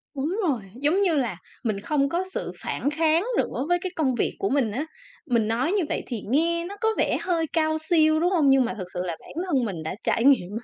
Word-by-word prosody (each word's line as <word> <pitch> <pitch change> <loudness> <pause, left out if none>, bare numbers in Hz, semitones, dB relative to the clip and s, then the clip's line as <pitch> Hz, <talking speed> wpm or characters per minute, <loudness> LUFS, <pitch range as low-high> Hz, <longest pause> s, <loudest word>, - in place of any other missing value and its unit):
Đúng 310 +9 -2
rồi, 260 -8 0 0.2
giống 330 +7 +2
như 350 -5 +3
là 235 -10 0 0.3
mình 215 -4 -1
không 275 +5 0
có 350 +4 0
sự - - -3
phản 285 - -2
kháng 320 +3 +2
nữa 270 - -1
với 350 0 +3
cái 370 -2 -3
công 265 -6 +1
việc - - -1
của 195 - 0
mình 260 -6 +1
á. 275 +8 -2 0.4
Mình 235 -7 +1
nói 245 +9 0
như 400 -3 +2
vậy - - -2
thì 235 -5 -4
nghe 335 +6 +1
nó 400 - -7
có 445 - +3
vẻ - - +2
hơi 335 -3 0
cao 315 -1 +2
siêu, 315 -1 +3
đúng 350 +2 +2
hông? 305 -7 +4
Nhưng 270 -2 +5
mà - - -2
thực 185 -2 -5
sự 180 - -4
là 170 -3 -4
bản - - -14
thân 270 -9 +1
mình 175 -6 -4
đã 160 - -4
trải 230 - +1
nghiệm 215 -10 +4
á. 225 +3 -5
285 Hz, 255 wpm, -25 LUFS, 235-330 Hz, 0.4 s, Nhưng